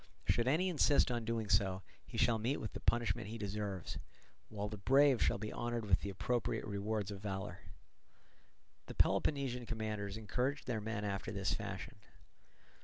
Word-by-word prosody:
Should 120 +1 +3
any 160 +8 +3
insist 150 -6 +4
on 120 -2 -1
doing 115 -1 -1
so, 95 -1 +2 0.2
he - - -7
shall 115 -1 +3
meet 125 +6 0
with 110 - -5
the - - -5
punishment 115 -5 +1
he 115 +2 -5
deserves, 100 -3 -3 0.5
while 105 -1 -3
the 105 -1 -6
brave 135 +3 +5
shall - - +3
be 110 - -5
honoured 120 -2 -2
with 95 -3 +3
the 100 - -3
appropriate 110 +3 -1
rewards 105 0 -2
of 100 -1 -7
valour." 95 -3 -4 1.3
The - - -7
Peloponnesian 130 -5 +2
commanders 110 -3 -3
encouraged 125 +6 -1
their 115 -4 -1
men 105 -1 -3
after 100 -1 -2
this 100 -2 0
fashion. - - -5
110 Hz, 165 wpm, -36 LUFS, 100-120 Hz, 1.3 s, brave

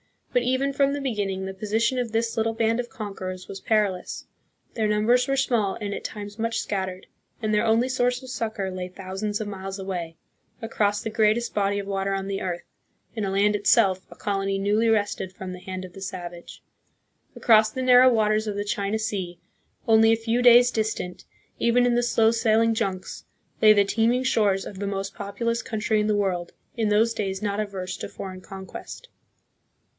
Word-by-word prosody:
But 245 - +3
even 260 +3 +1
from 280 0 +2
the 285 - -3
beginning 200 -7 -2
the 190 - -5
position 220 +6 0
of 240 -3 -2
this 225 +1 0
little 225 0 0
band 225 +1 +1
of 240 -1 -3
conquerors 185 -4 -6
was 195 - -7
perilous. 205 -5 -1 0.5
Their 220 -2 0
numbers 220 +5 +3
were 275 - +1
small 235 -7 +1
and 205 -2 -3
at - - -6
times 205 0 -7
much 230 0 -1
scattered, 190 -2 -3 0.3
and 215 -2 -1
their 210 +2 +2
only 225 +3 +3
source 250 0 0
of 260 - -9
succor 220 -6 -3
lay 185 -1 -4
thousands 195 +3 -4
of 215 - -4
miles 195 -1 -6
away, 180 -4 -5 0.5
across 205 -2 0
the - - -2
greatest 220 +2 +2
body 200 -1 +1
of 200 - -5
water 195 0 -1
on 195 0 -2
the 195 0 -3
earth, 175 -2 -3 0.5
in 220 -3 -2
a - - -1
land 200 +2 +2
itself 190 -2 +3
a - - -13
colony 195 -1 -1
newly 205 +3 +2
wrested 205 -3 0
from 185 -1 -7
the 180 - -8
hand 185 0 -6
of 180 - -12
the 195 - -11
savage. 175 -3 -8 0.7
Across 215 -2 +5
the 260 - -3
narrow 255 0 +7
waters 215 -1 +2
of 210 - -2
the 205 0 -2
China 205 +1 -1
Sea, 195 -5 -3 0.5
only 225 0 +6
a - - +2
few 230 +2 0
days' 245 0 +7
distant, 215 -5 -3 0.3
even 245 +1 +3
in 245 - +3
the 240 - +3
slow 225 -2 +3
sailing 225 0 +3
junks, 190 -4 -3 0.4
lay 215 -1 +8
the 205 -1 +4
teeming 230 +5 +1
shores 205 -6 +2
of 190 - -8
the 200 - -2
most 195 0 -3
populous 230 +4 -2
country 220 -2 -1
in 210 - +1
the 210 - +2
world, 185 -4 -1 0.2
in 225 -3 0
those 220 +2 +3
days 195 -3 -3
not 205 0 -1
averse 195 -3 -4
to - - -5
foreign 185 -1 -8
conquest. 195 - -9
210 Hz, 195 wpm, -25 LUFS, 195-230 Hz, 0.7 s, lay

